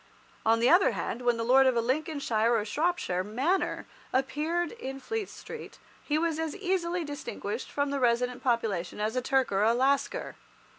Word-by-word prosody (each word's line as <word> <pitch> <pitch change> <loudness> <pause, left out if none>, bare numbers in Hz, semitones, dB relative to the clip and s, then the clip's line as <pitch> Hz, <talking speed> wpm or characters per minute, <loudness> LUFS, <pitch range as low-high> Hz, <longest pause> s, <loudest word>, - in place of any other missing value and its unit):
On 225 0 +4
the 235 - +3
other 360 +3 +5
hand, 240 - -3
when 240 -1 +2
the 230 - -1
lord 260 +3 +5
of 260 - +3
a - - +3
Lincolnshire 250 -3 +1
or 210 - -1
Shropshire 290 - 0
manor 265 - 0 0.3
appeared 305 +6 0
in 270 - -6
Fleet 435 +8 -3
Street, 470 - -9 0.3
he 300 - 0
was 325 -1 0
as 320 -2 -2
easily 360 -3 -1
distinguished 260 -6 -5
from 285 -1 -1
the 280 - -1
resident 245 0 +1
population 220 -8 -1
as 215 +3 -1
a 255 - +1
Turk 265 -1 +1
or 195 0 +1
a 225 +2 +4
Lascar. 270 +3 0
265 Hz, 180 wpm, -29 LUFS, 235-320 Hz, 0.3 s, other